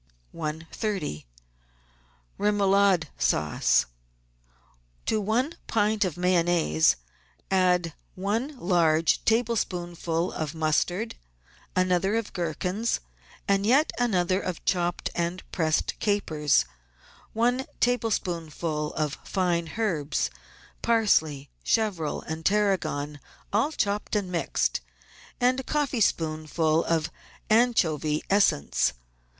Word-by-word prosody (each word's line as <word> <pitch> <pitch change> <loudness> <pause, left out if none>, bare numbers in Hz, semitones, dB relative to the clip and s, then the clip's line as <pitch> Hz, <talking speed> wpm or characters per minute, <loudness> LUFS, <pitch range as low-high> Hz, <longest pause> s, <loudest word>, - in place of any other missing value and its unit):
130— 160 - -4 1.1
REMOULADE 200 -4 +3
SAUCE 75 0 +2 1.2
To 215 -1 +1
one 240 +10 0
pint 215 -1 +2
of 180 -4 -2
Mayonnaise 175 - +3 0.6
add 180 -3 +2 0.2
one 225 +10 -2
large 165 -5 +2
tablespoonful 180 -7 0
of 155 0 -4
mustard, 175 +7 0 0.6
another 185 +2 +2
of 225 -2 -2
gherkins, 180 +6 -1 0.5
and 195 0 +2
yet 265 +9 +4
another 185 -5 +1
of 185 -2 -5
chopped 175 -1 0
and 170 +2 -2
pressed 160 -3 0
capers, 155 - +2 0.7
one 245 +4 +1
tablespoonful 170 -10 -1
of 150 -1 -2
fine 175 -3 -1
herbs, 160 - 0 0.5
parsley, 160 -12 +2
chervil, 200 -9 0
and 160 +1 -6
tarragon, 185 -8 0 0.3
all 225 +9 +2
chopped 210 -6 -1
and 195 -3 -1
mixed, 170 - 0 0.6
and 250 +1 +3
a - - -4
coffeespoonful 165 - +1
of 165 -1 0 0.4
anchovy 165 - +2
essence. 130 - +3
180 Hz, 90 wpm, -26 LUFS, 160-215 Hz, 1.2 s, yet